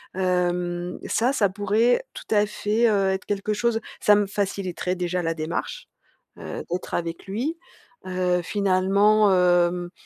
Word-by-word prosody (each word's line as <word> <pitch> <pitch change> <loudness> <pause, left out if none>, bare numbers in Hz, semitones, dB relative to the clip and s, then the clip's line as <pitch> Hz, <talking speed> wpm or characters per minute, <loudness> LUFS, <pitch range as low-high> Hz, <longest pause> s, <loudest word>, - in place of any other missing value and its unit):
hem, 180 -1 -1
ça, 245 +5 +1
ça 200 -7 +2
pourrait 210 - +1
tout - - -4
à 205 0 +4
fait, 215 +3 0
heu, 195 -2 +2
être 190 - -3
quelque 205 +1 -2
chose 225 +1 0 0.2
ça 210 - +5
me 205 0 +2
faciliterait 190 -2 -2
déjà 180 0 -2
la 165 0 0
démarche, 165 - -4 0.5
heu, - - -6
d'être 180 - -4
avec 170 -1 -3
lui. 255 - -3 0.5
Heu, 180 -1 0
finalement, 200 +2 +3
hem 175 -1 +2
190 Hz, 145 wpm, -24 LUFS, 180-210 Hz, 0.5 s, ça